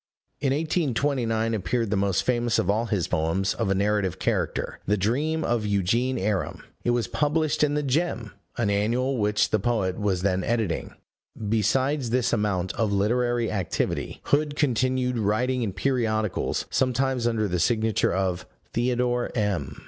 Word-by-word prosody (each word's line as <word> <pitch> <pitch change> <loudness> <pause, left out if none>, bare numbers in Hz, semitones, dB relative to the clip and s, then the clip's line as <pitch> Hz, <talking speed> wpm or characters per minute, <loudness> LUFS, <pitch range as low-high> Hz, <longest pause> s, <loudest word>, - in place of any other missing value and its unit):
In 140 -2 +1
1829 135 -7 0
appeared 110 +1 -1
the - - +2
most 100 -2 +1
famous 120 -1 +1
of 95 - +2
all 115 +3 0
his 100 -7 0
poems 80 +5 0
of - - -2
a 95 - +2
narrative 100 -2 +1
character - - -1
The 105 +2 +2
Dream 145 +11 0
of 120 -2 0
Eugene 105 +6 +1
Aram; 100 -2 -2 0.2
it - - 0
was 120 -1 +2
published 150 0 +1
in 145 -1 +2
the 150 - 0
Gem, 140 -5 -1 0.3
an 110 -4 +1
annual 120 +6 +1
which 105 0 +2
the 110 - +3
poet 100 -4 0
was 95 -3 0
then 95 -1 +1
editing. 110 -7 -1 0.4
Besides 115 +6 +1
this 125 0 +1
amount 100 -5 0
of 110 -3 0
literary 120 +3 +1
activity, 95 -5 -2
Hood 145 0 +1
continued 130 -2 +1
writing 120 +5 +1
in 110 -4 -1
periodicals, 110 -1 0
sometimes 130 -1 +1
under 110 -2 +1
the 90 -2 -1
signature 110 +1 +2
of 95 -1 -1 0.3
"Theodore 120 0 0
M." 100 - -1
115 Hz, 155 wpm, -25 LUFS, 100-125 Hz, 0.4 s, the